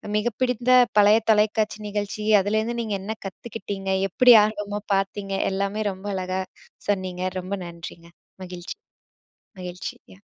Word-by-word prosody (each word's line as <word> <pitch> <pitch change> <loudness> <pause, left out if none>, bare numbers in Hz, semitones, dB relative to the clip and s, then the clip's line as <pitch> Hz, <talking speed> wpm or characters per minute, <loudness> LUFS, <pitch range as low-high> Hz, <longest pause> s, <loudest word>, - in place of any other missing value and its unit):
மிக 210 +2 +1
பிடிந்த 250 -1 0 0.3
பழைய 210 +1 +7
தொலைக்காட்சி 215 0 +2
நிகழ்ச்சி 205 +1 -3 0.2
அதுலேருந்து 220 +4 0
நீங்க 215 -3 -2
என்ன 215 +3 -4
கத்துக்கிட்டிங்க. 195 -1 -5 0.2
எப்படி 245 +6 +7
ஆர்வமா 205 -1 -2 0.2
பார்த்தீங்க 195 0 -2 0.2
எல்லாமே 200 +2 -1
ரொம்ப 190 +2 -9
அழகா 185 0 -2 0.5
சொன்னீங்க 185 -2 -1 0.2
ரொம்ப 185 +2 -6
நன்றிங்க. 170 0 -10 0.3
மகிழ்ச்சி. 180 -1 -7 0.8
மகிழ்ச்சிங்க. 180 +1 -8
205 Hz, 115 wpm, -24 LUFS, 185-215 Hz, 0.8 s, பழைய